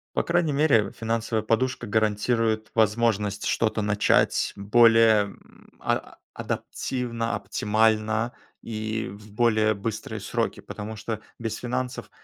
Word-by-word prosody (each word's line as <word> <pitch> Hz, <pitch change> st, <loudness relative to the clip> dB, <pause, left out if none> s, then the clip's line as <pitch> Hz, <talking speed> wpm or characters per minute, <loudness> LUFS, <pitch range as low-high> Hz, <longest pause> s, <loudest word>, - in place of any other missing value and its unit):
По -, -, +1 dB
крайней, 170 Hz, -3 st, +1 dB
мере 135 Hz, -9 st, +3 dB
финансовая 115 Hz, -1 st, -1 dB
подушка 125 Hz, +4 st, 0 dB
гарантирует 110 Hz, +1 st, +1 dB
возможность 105 Hz, -2 st, +1 dB
что-то 110 Hz, -1 st, +1 dB
начать 105 Hz, 0 st, +2 dB
более, 115 Hz, +1 st, +5 dB
м, 100 Hz, -, -16 dB
а -, -, -2 dB, 0.2 s
адаптивно, 115 Hz, -3 st, -3 dB
оптимально 110 Hz, +3 st, +1 dB, 0.3 s
и 110 Hz, 0 st, -3 dB
в 105 Hz, +1 st, -13 dB
более 110 Hz, -1 st, +3 dB
быстрые 110 Hz, +1 st, -5 dB
сроки, 115 Hz, +2 st, -2 dB
потому 110 Hz, +1 st, -7 dB
что 110 Hz, 0 st, -4 dB, 0.2 s
без 115 Hz, -2 st, -3 dB
финансов 125 Hz, +1 st, -4 dB
110 Hz, 115 wpm, -25 LUFS, 105-115 Hz, 0.3 s, более